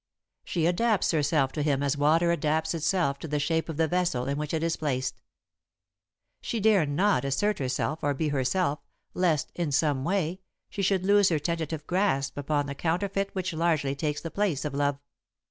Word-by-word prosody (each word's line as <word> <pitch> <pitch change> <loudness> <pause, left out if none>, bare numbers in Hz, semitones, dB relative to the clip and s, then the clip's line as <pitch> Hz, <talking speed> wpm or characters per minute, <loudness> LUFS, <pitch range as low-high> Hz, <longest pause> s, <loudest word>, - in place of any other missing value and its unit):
She 165 -3 -1
adapts 205 +4 +2
herself 145 -3 +1
to 150 - -3
him 145 -2 +1
as 140 0 +1
water 160 +4 +3
adapts 160 -1 0
itself 165 -3 0
to - - -6
the 150 0 -1
shape 160 +3 0
of 160 - -4
the 160 0 +2
vessel 175 -7 0
in 140 - -1
which 150 -1 -3
it 160 -1 -1
is 165 0 +1
placed. 130 -4 -2 1.2
She 230 - -3
dare 205 -7 +4
not 185 +8 +2
assert 190 +10 0
herself 135 +4 -1
or 145 0 0
be 155 +2 -1
herself, 145 +3 0 0.3
lest, 170 -6 +1
in 170 -4 -2
some 140 -2 +1
way, 180 +1 -1 0.3
she 200 - -3
should 190 -1 +1
lose 200 0 +5
her 165 - +2
tentative 160 -1 -3
grasp 175 -8 0
upon 145 0 -1
the 140 - -4
counterfeit 195 +6 -1
which 185 -2 -2
largely 160 -4 +1
takes 150 +1 -2
the 165 - -6
place 185 -9 -1
of 150 - -3
love. 145 0 0
160 Hz, 185 wpm, -27 LUFS, 145-180 Hz, 1.2 s, lose